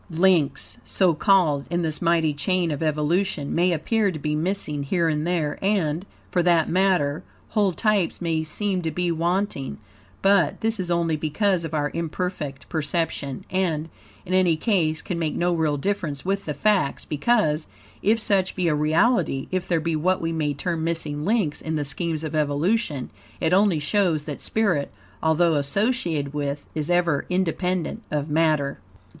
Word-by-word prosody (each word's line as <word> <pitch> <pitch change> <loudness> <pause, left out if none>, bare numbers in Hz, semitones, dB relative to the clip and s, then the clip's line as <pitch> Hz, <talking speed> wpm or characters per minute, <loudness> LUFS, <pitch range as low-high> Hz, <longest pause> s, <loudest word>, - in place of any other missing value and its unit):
Links, 170 -3 +2
so 185 -3 +2
called, 160 -5 +3
in 175 0 0
this 155 -2 -1
mighty 165 -3 +2
chain 170 +3 0
of 145 - -3
evolution, 155 +1 0
may 180 +2 +3
appear 205 +6 +1
to 160 - -5
be 150 0 -2
missing 155 -2 -1
here 170 +4 +1
and 155 0 0
there, 165 -4 -1
and, 185 -3 0 0.2
for 180 - +2
that 170 -2 +3
matter, 180 -6 +1 0.3
whole 205 -3 +2
types 205 -1 0
may 165 -2 0
seem 185 +4 -2
to 165 - -2
be 175 +2 -1
wanting, 170 -3 -1 0.5
but, 195 -6 +3
this 225 -1 0
is 180 -2 -2
only 170 -2 +1
because 170 +4 0
of 160 -1 -4
our 145 -1 0
imperfect 165 -4 -4
perception, 155 -3 -2
and, 165 -4 0 0.4
in 185 - -4
any 180 -3 +3
case, 160 -5 +1
can 175 -3 -3
make 160 -2 -1
no 175 0 +1
real 155 -3 +1
difference 165 -4 -2
with 195 +1 -1
the 150 - -3
facts, 200 -4 +1
because, 155 -2 +1 0.3
if 220 +3 +3
such 195 -3 +1
be 180 -2 0
a 160 - +3
reality, 155 - +2
if 185 -1 -2
there 170 -2 +2
be 165 0 -1
what 180 +4 +1
we 165 0 -2
may 155 -3 0
term 160 +3 -2
MISSING 160 -3 -2
LINKS 200 -8 0
in 160 0 -3
the 150 -1 -1
scheme 165 +3 -2
of 155 0 -4
evolution, 150 - 0 0.3
it 165 +1 +1
only 195 -3 +4
shows 160 0 +1
that 150 -2 -6
spirit, 195 -10 0 0.3
although 160 +1 +3
associated 155 - 0
with, 145 -1 -3
is 155 0 -3
ever 175 -4 +1
independent 180 -1 -1
of 150 0 -2
matter. 155 -3 +1
165 Hz, 170 wpm, -24 LUFS, 150-185 Hz, 0.5 s, only